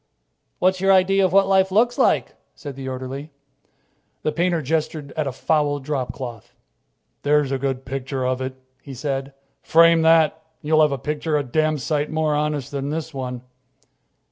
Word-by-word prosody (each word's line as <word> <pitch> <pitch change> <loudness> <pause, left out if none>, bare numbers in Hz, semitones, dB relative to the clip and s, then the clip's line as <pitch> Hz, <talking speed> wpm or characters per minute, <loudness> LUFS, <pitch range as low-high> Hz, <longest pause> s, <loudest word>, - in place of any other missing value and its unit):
"What's 185 0 +1
your 195 0 +4
idea 195 +1 +4
of 185 - +2
what 195 +1 +5
life 190 -1 +3
looks 235 +5 +2
like?" - - +2 0.2
said 140 -3 -8
the 135 -1 -6
orderly. 130 +3 -6 0.9
The 155 - +1
painter 170 0 0
gestured 150 0 -2
at 155 -2 -2
a - - -1
foul 145 +2 0
dropcloth. 130 -4 -5 0.7
"There's 145 -1 +2
a 135 - -1
good 135 -1 -3
picture 130 0 -3
of 130 0 -1
it," 130 0 -4 0.3
he 135 -1 -9
said. 135 +1 -4 0.3
"Frame 165 0 +5
that, 160 -1 +5 0.3
and - - -11
you'll 155 0 +5
have 150 -1 +4
a 140 - -1
picture 150 +3 -2
a 145 - 0
damn 155 +4 0
sight 145 +2 -1
more 155 -1 0
honest 150 -2 -1
than 140 0 -3
this 160 +1 -4
one." 125 -2 -5
150 Hz, 170 wpm, -22 LUFS, 135-160 Hz, 0.9 s, what